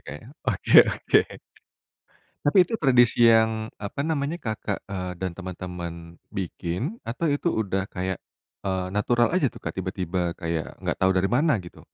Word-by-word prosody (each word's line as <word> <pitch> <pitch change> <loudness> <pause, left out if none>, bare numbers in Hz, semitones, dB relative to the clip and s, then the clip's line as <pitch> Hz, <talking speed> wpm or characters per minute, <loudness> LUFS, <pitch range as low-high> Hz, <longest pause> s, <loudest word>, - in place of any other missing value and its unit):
Kak 75 - -5
ya, - - -14 0.2
oke 105 - +3
oke. - - +3 1.2
Tapi 145 +6 +4
itu - - -3
tradisi 125 - +4
yang, 110 0 +2
apa 105 +6 -5
namanya, 155 0 -1
Kakak, 110 - -4
eee, 90 -3 -4
dan 95 0 -3
teman-teman 90 -2 -6 0.4
bikin, 95 - -4
atau 120 +8 -4
itu 145 +4 0
udah 95 - -1
kayak, 95 0 -3 0.4
eee, 95 -2 -2
natural 120 +6 +2
aja 155 -8 +3
tuh - - -17
Kak - - -2
tiba-tiba 90 -2 -2
kayak 85 -3 -3
nggak - - 0
tahu 95 0 +4
dari 95 +1 +2
mana 145 0 +3
gitu? 85 - -12
100 Hz, 155 wpm, -25 LUFS, 90-120 Hz, 1.2 s, Tapi